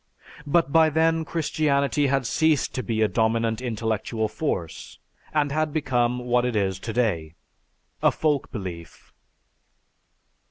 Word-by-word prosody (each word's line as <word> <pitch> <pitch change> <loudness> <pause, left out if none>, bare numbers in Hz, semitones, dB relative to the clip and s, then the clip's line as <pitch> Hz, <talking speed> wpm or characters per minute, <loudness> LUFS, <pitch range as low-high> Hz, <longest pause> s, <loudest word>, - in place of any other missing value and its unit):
But 160 0 +2
by 160 0 +5
then 160 +1 +2
Christianity 145 -3 0
had 135 -1 +1
ceased 155 +4 +1
to 130 - -2
be 110 -3 0
a - - +4
dominant 115 +1 0
intellectual 110 -1 -2
force 105 - -4 0.3
and 145 -2 +1
had 155 +1 0
become 125 -5 0
what 125 0 +1
it 125 -2 -1
is 95 -2 0
today, 100 -9 -1 0.7
a - - +4
folk 150 -3 -1
belief." 90 -6 -8
125 Hz, 125 wpm, -24 LUFS, 110-150 Hz, 0.7 s, by